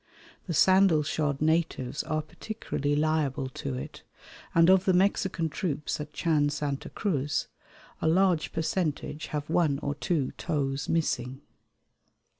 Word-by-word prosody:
The 170 - -2
sandal 185 -3 +5
shod 145 -1 -1
natives 155 -4 0
are 155 0 -1
particularly 155 -6 -3
liable 150 -3 0
to 130 0 -5
it, 125 - -7 0.5
and 165 0 +6
of 190 0 +5
the 185 - +4
Mexican 190 -2 +1
troops 155 -3 -3
at 150 - -7
Chan 150 -4 +1
Santa 145 -1 -3
Cruz 150 -9 -1 0.5
a - - +1
large 180 -1 +3
percentage 160 -2 -2
have 150 -1 -4
one 160 -4 +2
or 145 - -1
two 150 -2 -1
toes 140 -4 -2
missing. 135 -5 -1
155 Hz, 130 wpm, -28 LUFS, 145-170 Hz, 0.5 s, and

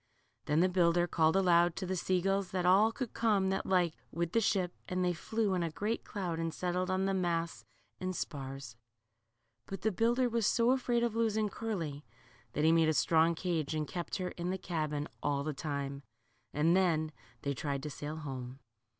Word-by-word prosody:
Then 150 +3 +2
the 185 - +5
builder 175 -1 +3
called 160 -1 +2
aloud 175 -2 +4
to 190 - -3
the 185 +1 -2
sea 180 0 +1
gulls 195 0 0
that 185 -1 -1
all 200 +5 +5
could 250 0 -5
come 205 -4 +2
that 190 - -2
liked, 180 -4 +2 0.2
with 170 0 -2
the 230 - +3
ship, 190 -5 +1 0.2
and 180 0 0
they 180 - +2
flew 215 +4 -1
in 180 - 0
a 170 - 0
great 210 +8 -2
cloud 180 -5 -3
and 165 0 -1
settled 180 +2 -2
on 185 +1 +1
the 195 - +1
masts 170 -3 -1 0.4
and 185 +3 -3
spars. 135 -6 -5 0.9
But 195 -2 -6
the 220 - +2
builder 235 +6 +2
was 230 -3 +1
so 235 +1 +3
afraid 245 -2 +1
of 235 -2 0
losing 220 -2 +1
Curly, 170 -10 -4 0.5
that 150 - 0
he 160 - +6
made 165 -1 +4
a 155 - +1
strong 165 +2 +4
cage, 165 -3 -1
and 155 -1 -1
kept 175 +3 -4
her 185 -1 -2
in 175 +1 -4
the 190 - -1
cahin 155 -5 -2
all 140 -1 0
the 155 +1 -2
time. 140 -1 -4 0.5
And 160 +4 +3
then 160 -5 +2 0.3
they 140 - 0
tried 140 0 -3
to 150 - -4
sail 145 +3 -5
home. 135 -4 -6
175 Hz, 200 wpm, -32 LUFS, 155-195 Hz, 0.9 s, he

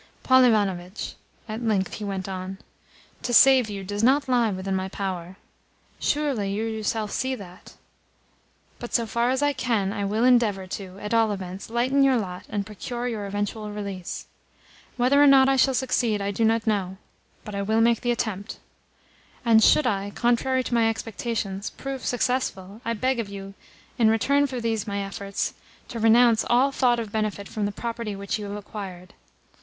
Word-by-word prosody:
"Paul 260 0 +6
Ivanovitch," 195 -4 0 0.3
at 215 +1 -5
length 210 -5 0
he 215 - -6
went 195 -2 -3
on, 190 0 -5 0.6
"to 245 - -3
save 260 -4 +7
you 200 -1 -5
does 205 +3 -3
not 275 +4 +4
lie 245 -3 +3
within 190 0 -3
my 190 0 -2
power. 185 -2 -5 0.6
Surely 275 -10 0
you 210 +3 -2
yourself 220 -1 -2
see 260 0 -1
that? 180 -6 -12 1.0
But, 240 - -5
so 235 - +2
far 235 +2 0
as 260 +2 +1
I 290 0 +2
can, 225 -7 0
I 205 -2 -3
will 215 +4 0
endeavour 230 -6 +3
to, 185 0 -7
at 210 +2 -5
all 225 -2 +3
events, 190 0 -6
lighten 250 +4 +1
your 265 -2 +4
lot 180 -5 -5
and 205 -1 -2
procure 240 +4 -5
your 215 -4 -3
eventual 205 +1 -3
release. 200 -4 -5 0.7
Whether 260 +4 +4
or 290 - +7
not 270 -1 +7
I 270 - +3
shall 265 0 +3
succeed 245 -4 +1
I 200 0 -2
do 215 +3 -1
not 225 0 +2
know; 195 -4 -1 0.5
but 210 - -7
I 200 - -2
will 220 +3 +1
make 230 0 +3
the 245 - -1
attempt. 220 -3 -2 0.9
And 225 -1 +6
should 305 - +5
I, 200 -1 0
contrary 255 +2 +1
to 245 - -5
my 230 -1 +4
expectations, 220 -3 -3
prove 270 -1 -6
successful, 235 -5 -2
I 230 - -1
beg 255 +3 0
of 215 -3 -3
you, 195 0 -8 0.5
in 225 -2 +5
return 280 +6 +3
for 255 -2 -4
these 225 -2 -2
my 200 -1 -2
efforts, 195 0 -3 0.4
to 235 - -5
renounce 225 0 +5
all 255 +3 +4
thought 245 -3 +2
of 220 -3 -5
benefit 210 -2 -2
from 210 -2 -2
the - - -3
property 230 -1 -4
which 200 +2 -3
you 210 - -5
have 200 0 -5
acquired. 195 -3 -8
220 Hz, 180 wpm, -25 LUFS, 200-245 Hz, 1.0 s, save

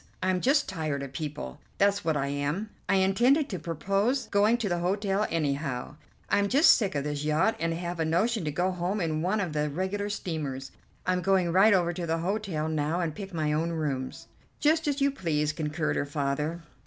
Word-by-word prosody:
I'm 185 -1 +1
just 280 +3 +3
tired 155 -6 -2
of 135 -1 -8
people, 145 - -5 0.2
that's 200 0 +2
what 160 -2 +1
I 135 - 0
am. 145 +9 -2 0.2
I - - +4
intended 240 +10 +3
to 185 - -4
propose 195 - 0
going 210 +3 +4
to 230 -3 -2
the 175 -2 0
hotel 195 +3 0
anyhow. 140 -4 -2 0.3
I'm 200 0 +2
just 290 - +7
sick 200 -8 +2
of 140 - 0
this 145 0 -3
yacht, 155 +9 +2
and 165 0 0
have 175 0 -4
a - - +2
notion 200 +7 +1
to 150 - -1
go 180 +5 0
home 180 +3 -2
in 160 -3 -1
one 190 +6 +1
of 180 -6 -2
the 150 0 0
regular 190 +6 -2
steamers. 150 -9 -4 0.3
I'm 180 0 +1
going 185 -2 +2
right 195 +5 +6
over 175 -2 +1
to 175 -1 -4
the 165 +1 +1
hotel 180 -3 -2
now 155 +2 0
and 165 -3 -1
pick 195 +2 -7
my 155 -3 0
own 165 +2 0
rooms." 140 -5 -3 0.3
"Just 315 +1 +2
as 285 -1 0
you 280 0 +4
please," 155 - -1
concurred 155 0 -1
her - - 0
father. 150 +3 -2
170 Hz, 205 wpm, -28 LUFS, 150-200 Hz, 0.3 s, just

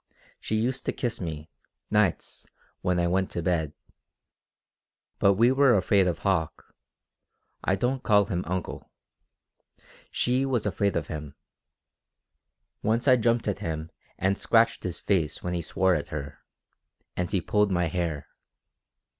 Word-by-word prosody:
She 110 - -3
used 125 +4 -1
to - - +2
kiss 120 -5 -3
me, 80 -3 -6 0.4
nights, 105 -5 0 0.3
when 90 -1 +1
I 85 - +2
went 95 +2 +1
to 85 - -3
bed. 80 -4 0 1.5
But 100 - +5
we 115 +5 +4
were 135 -2 +5
afraid 95 0 +3
of 85 -2 -2
Hauck 90 -6 -1 0.9
I 95 - +2
don't 125 +6 -1
call 105 -4 +4
him 90 -1 -2
'uncle.' 90 0 -4 1.2
She 125 +2 +1
was 130 -5 0
afraid 100 0 0
of 80 - -1
him. 75 -2 -7 1.5
Once 115 +5 0
I 130 - +7
jumped 115 -1 +1
at 100 - -1
him 80 0 -4 0.3
and 95 +1 0
scratched 115 0 +3
his 90 -3 -4
face 85 -6 -1
when 90 - -2
he 85 - -1
swore 95 +3 +1
at 75 -1 -2
her, 75 -3 -6 0.8
and 90 -1 -2
he 100 -2 +1
pulled 105 +4 +1
my 90 -1 +1
hair. 85 -3 -3
95 Hz, 145 wpm, -27 LUFS, 85-110 Hz, 1.5 s, I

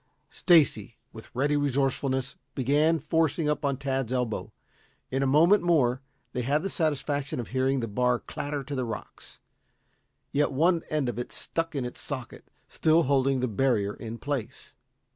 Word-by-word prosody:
Stacy, 150 -8 +3 0.2
with 110 -1 -11
ready 145 +4 +2
resourcefulness, 135 -1 0 0.2
began 145 +5 +3
forcing 160 0 0
up 150 0 0
on 140 -2 0
Tad's 135 -3 -2
elbow. 125 -4 -2 0.6
In 135 +1 0
a 135 - +2
moment 165 +9 +5
more 140 -7 +2 0.3
they 125 - -1
had 145 +6 +1
the 195 - -2
satisfaction 145 -4 -1
of 120 - -5
hearing 130 0 +1
the 115 - -2
bar 125 +3 +1
clatter 145 +1 -5
to 140 - -7
the 130 -2 -1
rocks. 115 -3 -8 0.9
Yet 145 +1 +1
one 165 +5 +3
end 150 -4 0
of 120 -1 -3
it 120 - -3
had - - -19
stuck 165 -1 -3
in 135 -3 -1
its 125 - -7
socket, - - -7 0.2
still 160 +1 +3
holding 135 -1 +2
the 125 - +1
barrier 110 -3 +1
in 115 0 -7
place. 140 -3 -5
135 Hz, 165 wpm, -27 LUFS, 125-150 Hz, 0.9 s, moment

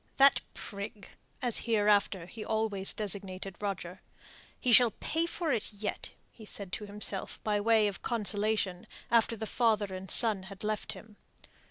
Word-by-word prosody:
"That 275 +1 +6
prig," 200 -1 -8 0.3
as 245 -3 0
hereafter 205 -5 +2
he 215 +5 -8
always 220 -3 0
designated 195 -2 -3
Roger 190 -3 -4 0.6
"he 245 - +2
shall 240 +1 +8
pay 325 +2 0
for 335 -2 -2
it 230 -1 -2
yet," 205 0 -5 0.2
he 225 - -15
said 200 -3 -5
to 210 - -5
himself 205 -1 0
by 210 -1 0
way 220 0 +4
of 200 -3 -5
consolation, 210 -4 -1 0.2
after 230 -1 +3
the 220 - -4
father 215 -3 +1
and 185 0 -7
son 220 -5 +7
had 195 0 -11
left 215 0 -2
him. 215 -1 -14
210 Hz, 155 wpm, -30 LUFS, 200-225 Hz, 0.6 s, shall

